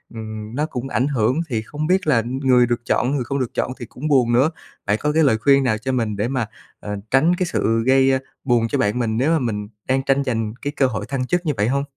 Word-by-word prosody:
ừm, 110 0 -7
nó 150 - 0
cũng 135 -3 -5
ảnh 130 +1 +1
hưởng, 130 +2 +1
thì 115 -3 -1
không 150 +7 -4
biết 185 -2 +1
là 115 -7 +3
người 130 0 +3
được 120 0 -2
chọn, 125 - +1
người 130 - -1
không 140 +3 -3
được 125 - -3
chọn - - -1
thì 120 - -6
cũng 135 +7 -6
buồn 130 -5 +3
nữa. 135 +7 +4 0.3
Bạn 105 - +1
có 150 - +1
cái 160 0 +4
lời 110 -6 +3
khuyên 140 +2 +4
nào 110 -4 +1
cho 130 +4 -3
mình 115 -5 -1
để 105 +3 0
mà, 130 -3 -1 0.3
ờ, 105 0 -5 0.2
tránh 160 +7 +4
cái 185 - -1
sự 115 -8 0
gây, 135 0 +5
a, 130 - +2 0.2
buồn 120 -3 +2
cho - - -1
bạn 105 +4 0
mình 110 -2 -1
nếu 140 +6 +2
mà 165 - +2
mình 105 -5 -3 0.2
đang 135 0 +1
tranh 140 0 +2
giành 110 -4 -2
cái 145 +1 -3
cơ 135 - +3
hội 110 - -4
thăng 130 -2 -2
chức 175 0 0
như 150 - +1
vậy 105 +2 +1
hông? 140 +2 0
130 Hz, 270 wpm, -21 LUFS, 115-140 Hz, 0.3 s, gây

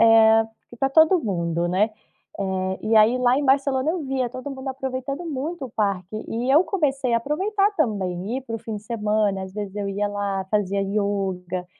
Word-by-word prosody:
eh, 225 0 +6 0.3
que 240 - -12
tá 270 - +1
todo 320 +6 +5
mundo, 170 - -1
né? 195 +5 +2 0.5
Eh, 190 -1 -2
e 220 +1 +1
aí, 220 +4 +5
lá 250 0 +3
em 285 - 0
Barcelona 270 +1 +2
eu 335 -2 -3
via 260 -3 -1
todo 255 +2 -7
mundo 265 0 -6
aproveitando 265 +3 -4
muito 300 +1 -4
o - - -14
parque 200 -3 -2
e 235 +3 -2
eu 310 +5 +7
comecei 275 -8 0
a - - +5
aproveitar 390 - 0
também, 200 - -1
ir 265 - -9
pro 230 -3 -5
fim 220 -2 -5
de 205 - -9
semana, 210 -3 0
às 190 - -8
vezes 205 -1 -5
eu 205 -1 -3
ia 200 +1 -1
lá, 200 -2 -2
fazia 200 -2 +1
yoga, 195 -3 -2
225 Hz, 195 wpm, -23 LUFS, 200-270 Hz, 0.5 s, eu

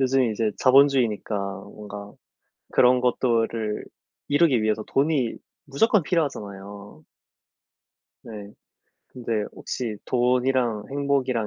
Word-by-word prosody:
요즘에 130 -2 +2
이제 110 0 0
자본주의니까 130 -5 +3 0.3
뭔가 105 0 -10 0.6
그런 125 0 +5
것들을 115 -3 0 0.4
이루기 145 -5 +3
위해서 110 0 0
돈이 135 -4 +1 0.3
무조건 195 +8 +2
필요하잖아요. 100 - -4 1.2
네. 105 -2 -9 0.5
근데 115 -4 -3
혹시 115 -4 -5
돈이랑 125 -3 +1
행복이랑 135 -5 0
120 Hz, 245 characters per minute, -24 LUFS, 105-135 Hz, 1.2 s, 그런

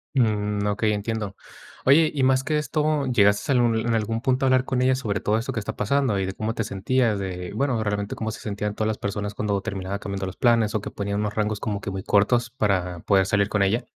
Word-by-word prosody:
Mm. 105 -4 +1
Okey, 105 +1 +1
entiendo. 105 -1 -3 0.5
Oye, 155 +4 +5
y 145 - -1
más 130 0 +3
que 155 +2 0
esto, 150 -1 0
¿llegaste 105 +1 +3
a - - +3
algun 120 -2 +3
en 115 +1 -1
algún 115 +1 -1
punto 130 +1 +1
a - - +4
hablar 130 -1 +4
con 125 -1 0
ella 130 +1 +4
sobre 105 -6 -2
todo 105 +1 +1
esto 130 +4 -4
que 115 - -2
está 100 - -5
pasando 125 -2 +1
y 95 - 0
de 95 - -4
cómo 110 +2 -3
te 115 - -2
sentías? 110 +3 0
De, 90 -2 -5
bueno, 125 -1 0
realmente, 105 -1 -2
cómo 110 - -3
se - - -8
sentían 105 0 -3
todas 110 - -1
las 110 - -1
personas 105 +1 -3
cuando 105 -1 -1
terminaba 95 0 -4
cambiando 100 -1 -4
los 95 - -8
planes, 115 -3 +3
o 105 - 0
que - - -6
ponían 100 0 -3
unos 105 -1 -2
rangos 105 -1 -1
como 105 -2 -3
que - - -4
muy 95 0 -5
cortos 120 +4 +2
para 95 -7 0
poder 95 0 +3
salir 100 +1 +1
con 105 -2 +2
ella. 115 +6 +1
105 Hz, 245 wpm, -24 LUFS, 100-120 Hz, 0.5 s, Oye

